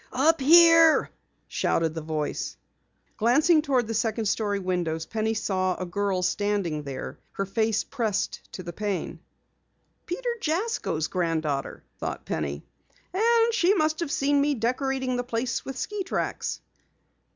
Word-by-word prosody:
"Up 300 +4 +3
here!" 330 +2 +7 0.4
shouted 165 -1 0
the 160 - -4
voice. 155 -1 -3 0.6
Glancing 300 +8 +4
toward 265 -5 +1
the 225 - -4
second 225 0 0
story 205 0 0
windows, 175 -4 -2
Penny 220 0 -1
saw 185 -3 0
a 185 - -4
girl 190 +1 -1
standing 195 -5 0
there, 140 -2 -6
her 195 - -2
face 220 +2 0
pressed 220 -6 -2
to 185 - -6
the 175 0 -7
pane. 205 0 -3 0.9
"Peter 475 +7 -2
Jasko's 325 - -1
granddaughter!" 160 -6 -2 0.2
thought - - -4
Penny. 70 -2 -3 0.5
"And 460 +3 +3
she 395 -3 +3
must 310 -3 +1
have 335 -5 -2
seen 280 +1 +2
me 290 0 +2
decorating 255 +2 -1
the 245 - -1
place 235 0 -2
with 270 -1 -6
ski 415 +7 -3
tracks." 380 - -3
225 Hz, 140 wpm, -26 LUFS, 185-300 Hz, 0.9 s, here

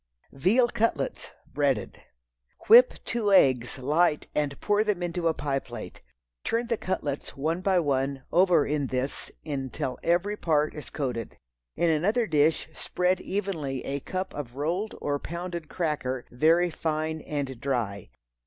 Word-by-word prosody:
Veal 210 - +3
Cutlets 235 - -1 0.2
(Breaded). 140 -7 -1 0.7
Whip 245 +3 +8
two 225 -4 0
eggs 130 -9 +4
light 150 +4 +2
and 145 -2 -1
pour 205 0 +2
them 205 -5 -1
into 175 -1 -1
a 165 - +3
pie 140 -1 -1
plate. - - -9 0.4
Turn 235 +1 0
the 235 0 0
cutlets, 145 -8 -3
one 160 +5 -1
by 190 -1 +3
one, 135 -3 0
over 175 -4 +4
in 145 -2 -1
this 130 +2 -3
until 135 -2 -3
every 175 +5 +1
part 155 -4 +1
is 150 - -8
coated. 125 -6 -4 0.4
In 170 -1 +2
another 205 +10 +2
dish 155 -2 +2
spread 180 +2 0
evenly 165 -10 -3
a 140 +1 -2
cupful 185 +2 -4
of 125 -4 -7
rolled 175 +9 -2
or 145 -1 -1
pounded 170 0 -5
cracker, 145 -7 -2
very 165 +7 +3
fine 155 0 -2
and 135 -5 -4
dry. 115 - -2
155 Hz, 145 wpm, -27 LUFS, 140-180 Hz, 0.7 s, Whip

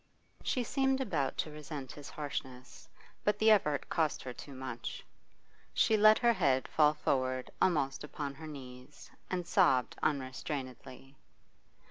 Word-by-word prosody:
She 250 - 0
seemed 270 +2 +1
about 165 - -1
to 155 - -2
resent 150 -3 -7
his 145 -2 -10
harshness, 130 -4 -6 0.3
but 210 - +2
the 220 0 +5
effort 150 -9 +3
cost 160 -3 0
her 125 - -5
too 140 +2 -10
much. 130 -3 -6 0.7
She 220 - +4
let 215 +1 +7
her 235 -1 +4
head 135 - +2
fall 150 -1 +4
forward 130 -3 -1
almost 140 -7 +2
upon 145 -1 -5
her 155 +3 -9
knees 125 -4 -11 0.2
and 180 -1 -2
sobbed 165 -9 +3
unrestrainedly. 135 -2 -4
145 Hz, 135 wpm, -33 LUFS, 130-175 Hz, 0.7 s, let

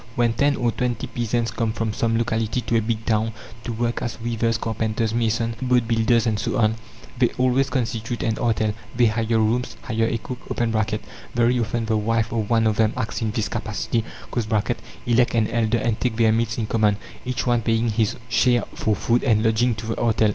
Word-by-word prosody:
When 120 -1 +2
ten 140 +4 +2
or 120 -3 +1
twenty 120 0 -2
peasants 120 0 -1
come 115 -1 -1
from 115 -2 -2
some 115 -2 +1
locality 115 +1 0
to 115 - -1
a 115 - +4
big 110 0 -2
town, 110 0 +1 0.3
to 120 - -4
work 120 +1 -1
as 120 - -4
weavers, 115 -1 0
carpenters, 110 0 -1
masons, 115 0 0
boat 125 -2 +2
builders, 115 0 +3
and 110 -2 0
so - - -1
on, 110 -1 +3 0.5
they 125 - +4
always 130 +2 +2
constitute 120 -2 -2
an 110 -1 0
artel. 110 -3 +1 0.2
They 120 0 +4
hire 115 0 +1
rooms, 115 +3 0
hire 115 -2 0
a 115 - 0
cook 125 +2 -7 1.0
(very 120 +1 +3
often 115 0 -1
the 110 -1 +1
wife 110 +1 0
of 110 -2 -1
one 115 -1 +3
of 110 -2 +2
them 110 -1 +3
acts 110 - -2
in 110 - 0
this 105 -1 -1
capacity), 110 +3 -2 1.0
elect 120 0 +3
an 110 -2 +3
elder, 115 0 +1
and 115 -1 -1
take 125 -3 0
their 110 -1 +4
meals 115 0 0
in 115 - -1
common, 105 -2 +2 0.3
each 125 0 -2
one 120 -1 +2
paying 115 +1 +1
his 110 -1 +1
share 120 -1 +3
for 110 - 0
food 120 +3 +1
and 110 -5 +3
lodging 115 +1 +2
to 110 +1 -7
the 115 - -3
artel. 110 -2 +3
115 Hz, 200 wpm, -23 LUFS, 110-120 Hz, 1.0 s, a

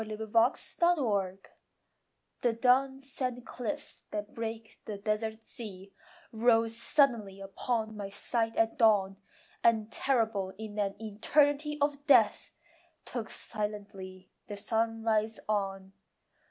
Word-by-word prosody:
SUNRISE 215 0 -6
IN 235 +10 +2
UTAH 200 -8 0 1.0
The 240 -2 +2
dun 265 +3 +3
sand 255 -2 -3
cliffs 285 +4 -5
that 210 0 -5
break 225 -1 -6
the 210 - -5
desert's 220 +2 -2
sea 195 -4 -8 0.4
Rose 225 0 +3
suddenly 230 -7 +2
upon 220 +3 -2
my 200 -2 -5
sight 225 +3 0
at 225 +3 +1
dawn, 200 -4 +4 0.5
And 225 -2 +3
terrible 220 -7 0
in 215 -1 -6
an 195 -1 0
eternity 290 +7 +2
Of 285 0 -1
death 245 -7 +4 0.5
took 230 -3 -5
silently 200 -3 -6 0.2
the 205 - -6
sunrise 225 0 0
on. 195 -2 -2
220 Hz, 115 wpm, -31 LUFS, 205-240 Hz, 1.0 s, dawn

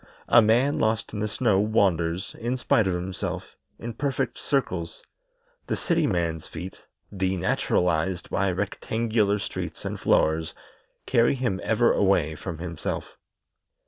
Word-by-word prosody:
A 120 - +8
man 120 +6 +3
lost 110 -1 0
in 105 - -3
the 105 - 0
snow 110 -2 +2
wanders, 95 -4 +1
in 120 +3 -1
spite 110 -4 +2
of 90 - +1
himself, 90 +1 -4 0.2
in 120 0 -6
perfect 135 +1 -2
circles; 95 - -2 0.6
the - - -1
city 165 -3 +1
man's 85 -5 -1
feet, 95 +1 -9 0.3
denaturalized 90 -2 0
by 100 +1 +1
rectangular 105 +2 0
streets - - -5
and - - -3
floors, 80 +1 +2 0.5
carry 120 +1 +3
him 120 -8 -1
ever 115 +2 +3
away 95 -6 +2
from 85 +2 -6
himself. 85 -1 -5
100 Hz, 130 wpm, -26 LUFS, 90-115 Hz, 0.6 s, A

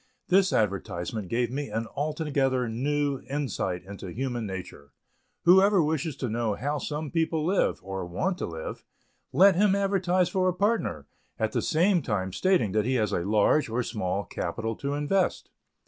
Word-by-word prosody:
This 190 +1 +4
advertisement 100 -1 -1
gave 120 +3 0
me 140 -1 -3
an 115 +2 -2
altogether 140 -4 0
new 140 +4 -1
insight 110 -10 -2
into 100 0 -8
human 120 +2 -3
nature. 90 -7 -8 0.5
Whoever 190 +1 +6
wishes 155 -1 -1
to 135 - -3
know 115 -2 -1
how 145 +6 -2
some 150 0 -4
people 160 -2 0
live, 190 +3 +1
or 95 0 -4
want 180 - -2
to - - -2
live, 80 -2 -6 0.5
let 195 +1 +6
him 200 +1 +4
advertise 190 -2 +2
for 185 +1 +1
a 180 - -2
partner, 210 +5 0 0.3
at - - 0
the - - 0
same 175 +3 +2
time 95 -7 -2
stating 185 - +2
that 105 +1 +1
he 130 - +1
has 105 -4 +1
a - - +1
large 105 - +3
or 120 +3 0
small 100 -4 -2
capital 115 +7 -4
to 140 +1 -2
invest. 180 +6 0
135 Hz, 165 wpm, -27 LUFS, 105-170 Hz, 0.5 s, Whoever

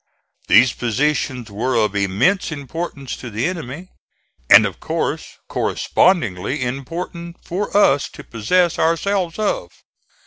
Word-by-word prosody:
These 115 +5 +6
positions 125 -1 -1
were 120 +5 -1
of 105 -3 +1
immense 100 - +1
importance 140 -2 -5
to 125 - -8
the 115 +2 -2
enemy; 165 0 -5 0.6
and - - +9
of - - -5
course - - -3
correspondingly 130 - +1
important 170 +7 -5
for 200 +3 -2
us 145 -9 +4
to - - -10
possess 170 - +1
ourselves 170 +2 0
of. 210 - -1
140 Hz, 115 wpm, -20 LUFS, 120-175 Hz, 0.6 s, and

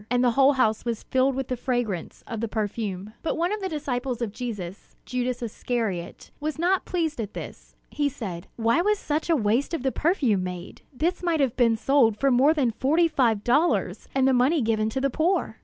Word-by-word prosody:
And 245 +1 +2
the 245 - +4
whole 275 +4 +5
house 220 -5 +1
was 235 -2 -3
filled 260 +1 +1
with 265 -1 -3
the 255 - -1
fragrance 240 -8 -3
of 225 -2 -5
the 230 - -1
perfume. 210 -2 -3
But 325 - -2
one 345 +4 0
of 425 - -4
the 380 - -2
disciples 265 -5 -3
of 235 -4 -2
Jesus, 205 -5 -7
Judas 250 -1 -2
Iscariot, 220 -5 -3
was 305 +1 -3
not 360 +3 +1
pleased 325 -8 -1
at 210 -2 -6
this. - - -9 0.2
He 290 -1 0
said: 185 -10 -6
"Why 230 +8 +2
was 420 +3 +2
such 310 -2 -2
a 330 - +5
waste 240 +6 +1
of 265 - -5
the 265 - +1
perfume 260 - +1
made? 180 -1 -7
This 330 +7 -1
might 340 -3 +1
have 265 -5 +1
been 230 -3 +3
sold 235 -4 +3
for 275 +3 +2
more 275 +6 +4
than 260 -6 +2
forty 310 +9 +2
five 235 -9 +1
dollars, 295 +8 +1
and 265 -1 +3
the 265 - +4
money 260 +4 +3
given 220 -1 +1
to 265 - -2
the 275 0 +1
poor!" 325 - 0
250 Hz, 210 wpm, -25 LUFS, 225-300 Hz, 0.2 s, whole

